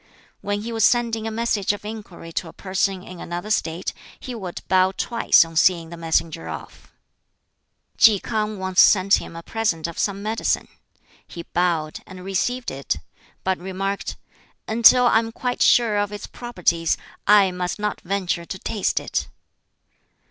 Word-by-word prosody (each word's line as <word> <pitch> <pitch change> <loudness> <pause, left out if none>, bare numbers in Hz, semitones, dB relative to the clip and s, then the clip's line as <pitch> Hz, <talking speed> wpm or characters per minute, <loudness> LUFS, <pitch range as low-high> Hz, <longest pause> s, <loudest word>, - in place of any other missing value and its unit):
When 205 0 -2
he 235 - -5
was 225 -1 0
sending 230 -2 +2
a - - -1
message 220 -3 0
of 205 - -9
inquiry 210 -6 -8
to 170 - -3
a 160 - -11
person 190 -1 -1
in 185 -2 -10
another 175 +5 -5
State, 170 -3 -1 0.3
he 255 - -7
would 190 -7 -6
bow 185 0 +3
twice 230 -7 +4
on 165 0 -12
seeing 165 0 +3
the - - -6
messenger 160 - -1
off. 80 - -9 1.1
Ki 215 -3 +7
K'ang 215 -1 -2
once 190 0 +3
sent 195 0 +5
him - - -10
a 165 - -8
present 210 -8 -1
of 170 -1 -5
some 200 0 -1
medicine. 220 +2 -1 0.6
He 170 - -8
bowed, 170 -4 -1
and 185 -1 -10
received 245 +6 -1
it; 135 -6 -2 0.5
but 190 -1 0
remarked, 190 +2 -3 0.5
"Until 235 +3 +6
I 230 - +5
am 225 0 -4
quite 245 +2 -3
sure 230 -4 +4
of 205 0 -1
its 205 - -6
properties 175 -8 -1 0.3
I 200 -2 +6
must 180 0 -3
not 210 0 -3
venture 185 -2 -2
to 190 - -6
taste 205 +1 -1
it." - - -3
195 Hz, 165 wpm, -23 LUFS, 175-220 Hz, 1.1 s, Ki